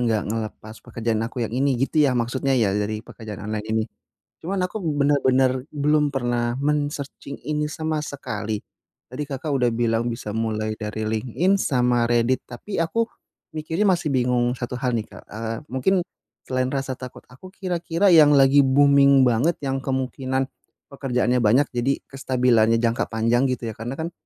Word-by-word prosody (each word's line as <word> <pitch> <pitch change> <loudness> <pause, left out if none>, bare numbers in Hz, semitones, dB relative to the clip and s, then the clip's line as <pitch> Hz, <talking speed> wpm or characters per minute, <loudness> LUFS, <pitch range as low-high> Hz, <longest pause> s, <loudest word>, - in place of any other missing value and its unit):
enggak 115 -3 +1
ngelepas 110 0 -5
pekerjaan 115 -2 -2
aku 120 -1 -3
yang 110 - -6
ini, 135 +1 +1
gitu 135 +5 +1
ya 135 -4 +3
maksudnya 130 +3 0
ya 105 -5 +2
dari 105 +1 -1
pekerjaan 105 -3 -9
online 105 0 -4
ini? 110 0 +1 0.6
Cuman 195 +3 -2
aku 220 - -6
benar-benar 135 -4 +2
belum 150 0 +2
pernah 120 -3 -1
men-searching 145 -1 -3
ini 150 0 0
sama 155 -1 -2
sekali. 110 -8 -4 0.5
Tadi 130 +5 -4
Kakak 140 +2 -5
udah 125 -2 +2
bilang 115 0 0
bisa 110 -3 -5
mulai 110 -1 -1
dari 110 0 -5
LinkedIn 130 - +1
sama 125 -8 +2
Reddit, 120 +2 +2
tapi 160 +12 -8
aku 225 +8 0 0.5
mikirnya 160 +6 0
masih 175 -5 +1
bingung 125 -1 +2
1 125 0 -5
hal 125 0 -1
nih, 110 -2 -2
Kak. - - -13
Eee, 115 +1 -4
mungkin 180 +8 +1 0.4
selain 130 0 -1
rasa 135 -1 -2
takut 125 -1 -9
aku, 135 +9 -13
kira-kira 180 0 0
yang 150 -3 +7
lagi 135 +1 +6
booming 140 0 +5
banget 125 +7 +2
yang 135 -1 -1
kemungkinan 130 0 -2 0.5
pekerjaannya 125 -2 0
banyak, 120 +5 +4
jadi 125 +3 -1
kestabilannya 125 -4 +2
jangka 115 0 +1
panjang 115 +4 +1
gitu 130 -1 -3
ya, - - -9
karena 120 +4 -4
kan 160 +4 -4
130 Hz, 160 wpm, -23 LUFS, 115-145 Hz, 0.6 s, yang